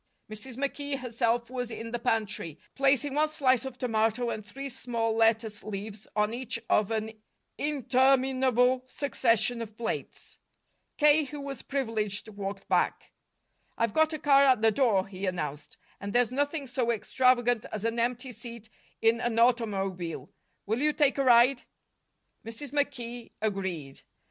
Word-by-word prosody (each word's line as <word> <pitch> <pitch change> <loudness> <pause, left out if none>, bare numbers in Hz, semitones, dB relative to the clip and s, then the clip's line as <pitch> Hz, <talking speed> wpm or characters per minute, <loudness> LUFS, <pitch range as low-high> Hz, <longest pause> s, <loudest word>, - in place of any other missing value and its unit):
Mrs. 230 +4 -7
McKee 280 0 -2
herself 235 -1 -1
was 250 -2 -3
in 230 0 -6
the 240 - -2
pantry, 210 -9 -1 0.2
placing 275 +1 +2
one 305 +2 +2
slice 265 -4 +2
of 260 -2 -7
tomato 230 0 0
and 215 - -5
three 270 +7 -7
small 235 -3 -2
lettuce 225 -2 +2
leaves 210 0 -7
on 210 +1 +1
each 245 -1 -2
of 210 -2 +3
an 220 -1 -2 0.5
interminable 260 -2 +2
succession 245 -4 +1
of 220 -1 -8
plates. 235 - -5 0.6
K., 300 0 +5
who 290 +2 -8
was 275 -3 -6
privileged, 225 -6 -2
walked 200 -1 -6
back. - - 0 0.7
"I've 230 -2 0
got 315 0 +3
a 310 - -3
car 280 -2 +5
at 255 -5 +4
the 225 - +6
door," 215 -6 +2
he 195 0 -5
announced, 150 -5 -4 0.2
"and 200 0 -5
there's 245 -1 +3
nothing 285 +2 -1
so 250 -2 -1
extravagant 245 0 +2
as 215 0 -4
an 230 +1 0
empty 250 +2 -1
seat 235 -1 -9 0.3
in 225 +1 +4
an 240 -2 -1
automobile. 195 -8 0 0.3
Will 220 +5 -1
you 300 0 +3
take 285 -2 +2
a - - +3
ride?" 245 +1 +5 0.8
Mrs. 230 +5 -7
McKee 245 -5 -3
agreed. 190 -10 -3
235 Hz, 150 wpm, -28 LUFS, 215-265 Hz, 0.8 s, the